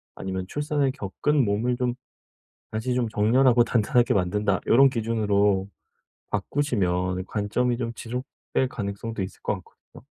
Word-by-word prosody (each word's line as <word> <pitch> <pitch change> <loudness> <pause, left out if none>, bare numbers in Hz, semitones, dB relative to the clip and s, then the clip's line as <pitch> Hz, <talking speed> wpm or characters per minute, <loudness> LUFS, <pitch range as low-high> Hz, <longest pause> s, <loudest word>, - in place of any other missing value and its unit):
아니면 95 -1 -4
'출산을 145 +1 0
겪은 130 +6 0
몸을 110 +4 0
좀 125 -1 0 0.8
다시 110 +4 -2
좀 125 -2 0
정렬하고 120 +3 +4
단단하게 120 +2 +2
만든다.' 100 +1 +1
요런 135 +3 +6
기준으로 105 -5 +1 0.6
바꾸시면 95 -6 0
관점이 115 +5 0
좀 115 -2 -2
지속될 125 +2 -3
가능성도 105 -1 -4
있을 95 - -7
것 - - 0
같거든요. 95 - -15
115 Hz, 315 characters per minute, -25 LUFS, 100-125 Hz, 0.8 s, 요런